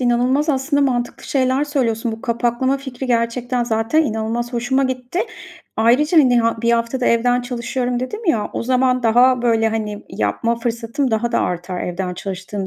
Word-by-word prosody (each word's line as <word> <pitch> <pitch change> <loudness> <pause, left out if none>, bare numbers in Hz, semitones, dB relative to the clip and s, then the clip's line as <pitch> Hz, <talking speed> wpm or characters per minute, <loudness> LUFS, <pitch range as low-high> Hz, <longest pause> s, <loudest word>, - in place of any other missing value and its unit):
inanılmaz 250 +5 +2
aslında 285 +1 +1
mantıklı 245 -3 -1
şeyler 265 +1 +1
söylüyorsun. 235 -6 -1
Bu 220 - -7
kapaklama 240 +2 0
fikri, 265 -1 -6
gerçekten 240 +1 0
zaten 225 +7 +1
inanılmaz 230 -1 -2
hoşuma 245 +3 +1
gitti. 255 +6 -2 0.6
Ayrıca, 265 +9 +4
hani, 250 -4 +5
ha 230 0 +1
1 235 - +3
hafta 235 +2 0
da 245 - +1
evden 245 +1 +3
çalışıyorum 245 0 -2
dedim 425 - -5
ya, 220 -10 +1
o - - -3
zaman 255 0 +2
daha, 245 +2 +4
böyle, 225 -2 +2
hani, 215 -2 -3
yapma 170 - -1
fırsatım 235 +3 -2
daha 230 +2 0
da - - +2
artar 180 +1 -3
evden 180 +1 -3
çalıştığım 195 +1 -5
240 Hz, 165 wpm, -19 LUFS, 225-260 Hz, 0.6 s, hani